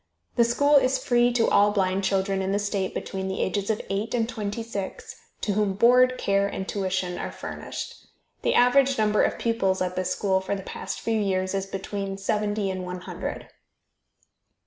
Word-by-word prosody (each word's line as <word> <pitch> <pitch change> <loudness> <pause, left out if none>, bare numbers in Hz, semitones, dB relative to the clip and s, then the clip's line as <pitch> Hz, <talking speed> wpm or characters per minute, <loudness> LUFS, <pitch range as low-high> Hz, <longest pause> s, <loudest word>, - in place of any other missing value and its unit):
The 235 - +5
school 285 +5 +4
is 260 -1 +3
free 240 -1 +3
to 235 -2 +3
all 205 +1 +5
blind 195 -1 0
children 195 0 +1
in 190 0 -1
the - - +2
state 200 -2 -2
between 190 -1 -4
the 190 - -3
ages 200 +2 -1
of 220 - +1
eight 205 +5 -1
and 230 -2 +1
twenty 215 -1 -4
six, 205 -4 -6 0.3
to 205 - 0
whom 205 -1 +1
board, 250 +4 +5
care 200 0 +1
and 190 -1 -5
tuition 185 -2 -2
are - - -4
furnished. - - -7 0.3
The - - +1
average 265 +2 +4
number 215 -1 +3
of - - +1
pupils 195 -5 0
at 180 0 -2
this 185 0 -1
school 190 0 +1
for 190 +1 -2
the 195 - -6
past - - -6
few 225 -1 0
years 190 -2 0
is 195 0 -2
between 195 0 -4
seventy 205 0 -1
and 185 -1 -4
one 180 0 -6
hundred. - - -6
200 Hz, 190 wpm, -25 LUFS, 190-225 Hz, 0.3 s, The